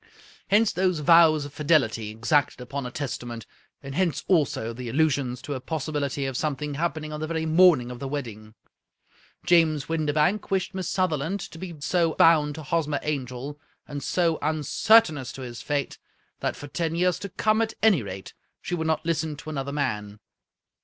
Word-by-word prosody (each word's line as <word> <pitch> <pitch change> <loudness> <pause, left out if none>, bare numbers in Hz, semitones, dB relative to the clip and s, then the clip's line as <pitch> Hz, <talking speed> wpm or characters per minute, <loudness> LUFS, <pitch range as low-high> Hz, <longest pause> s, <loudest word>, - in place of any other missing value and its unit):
Hence 210 +2 +4
those 185 -1 +1
vows 160 -2 +6
of 145 - -10
fidelity 135 -9 +1
exacted 135 +7 +1
upon 125 +1 -5
a - - -8
Testament, 120 -4 -5 0.4
and 140 0 -7
hence 175 0 0
also 145 -10 +1
the 120 0 -6
allusions 135 -2 0
to 145 - -4
a 130 - -4
possibility 145 -1 -3
of 135 -1 -3
something 150 +1 -2
happening 155 0 -3
on 150 - -5
th^ 155 - -2
very 160 0 -2
morning 160 -6 +5
of 125 - -8
the 135 - -4
wedding. 115 -6 -6 0.9
James 160 -4 +3
Windibank 155 +5 0
wished 190 -1 -1
Miss 185 -2 -3
Sutherland 185 0 0
to 165 - -9
be 175 -2 -7
so 165 +1 +1
bound 150 -3 +4
to 160 - -7
Hos 165 +1 0
mer 145 -1 -1
Angel, 140 0 -4 0.3
and 145 -1 -5
so 165 -1 +1
uncertain 155 +4 +3
as 130 -1 -6
to 135 - -8
his 120 -2 -7
fate, 145 -2 -2 0.4
that - - -2
for 145 - -9
ten 165 +2 -2
years 180 0 +1
to 200 - -6
come, 215 +4 +1
at 225 -1 -1
any 205 - +5
rate, 95 -2 -8 0.3
she - - -6
would 160 -2 -1
not 160 0 0
listen 160 -2 -1
to 155 +2 -8
another 140 -2 -3
man. 105 -8 -3
150 Hz, 180 wpm, -25 LUFS, 135-165 Hz, 0.9 s, vows